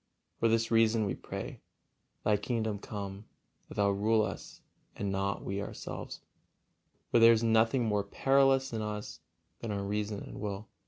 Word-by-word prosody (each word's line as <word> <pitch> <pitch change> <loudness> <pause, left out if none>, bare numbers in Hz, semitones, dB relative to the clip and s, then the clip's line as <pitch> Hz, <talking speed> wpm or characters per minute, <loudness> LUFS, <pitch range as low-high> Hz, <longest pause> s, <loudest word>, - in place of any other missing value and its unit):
For 115 - +3
this 115 0 +2
reason 115 -1 +4
we 100 - -1
pray: - - -7 0.6
"Thy 105 - +4
kingdom 110 -1 -1
come, 100 -1 -6 0.4
that - - -9
Thou 100 -1 +3
rule 110 +2 +2
us, 100 - -6 0.3
and 100 -1 -2
not: 100 0 -1
we 100 +1 -2
ourselves," - - -6 0.9
for 120 - +5
there 115 0 +9
is 115 0 +1
nothing 115 +2 +3
more 105 -2 +1
perilous 135 +4 +3
in 110 - -2
us 105 -4 -5 0.4
than 115 - -5
our 100 -1 -2
reason 105 0 -2
and - - -9
will. 105 0 -4
105 Hz, 160 wpm, -31 LUFS, 100-115 Hz, 0.9 s, there